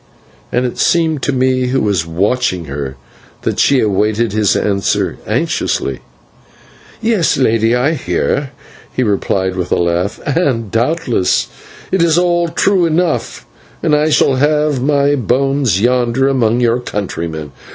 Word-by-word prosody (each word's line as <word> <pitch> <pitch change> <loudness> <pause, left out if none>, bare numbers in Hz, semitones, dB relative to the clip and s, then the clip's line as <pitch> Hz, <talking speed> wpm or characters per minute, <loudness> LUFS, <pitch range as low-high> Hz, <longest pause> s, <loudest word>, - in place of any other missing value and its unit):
and 125 +1 0
it 125 - -4
seemed 160 -4 +1
to 140 - 0
me, 130 -1 +1
who 130 +1 +1
was 95 -8 0
watching 95 +1 0
her, 70 -1 -5 0.5
that - - -2
she 140 - +4
awaited 105 +2 +1
his 105 -2 +2
answer 100 -2 0
anxiously. 70 -2 -1 1.0
"Yes, 220 -7 +2
Lady, 115 -2 +2
I 130 +6 +1
hear," 140 -1 -1 0.4
he 130 - -1
replied, 95 -3 0
with 90 -2 -4
a - - +4
laugh, 85 +3 -1
"and 130 - 0
doubtless 120 - 0 0.4
it 190 - +2
is 170 -1 +3
all 175 -1 +2
true 180 +1 +2
enough, 165 0 -1 0.4
and 160 -3 +1
I 150 +1 +3
shall 145 -2 +3
leave 150 -1 +1
my 140 +1 +2
bones 135 -3 +1
yonder 125 +3 +1
among 120 -3 +1
your 120 0 +2
countrymen. 85 - -5
125 Hz, 140 wpm, -15 LUFS, 105-145 Hz, 1.0 s, she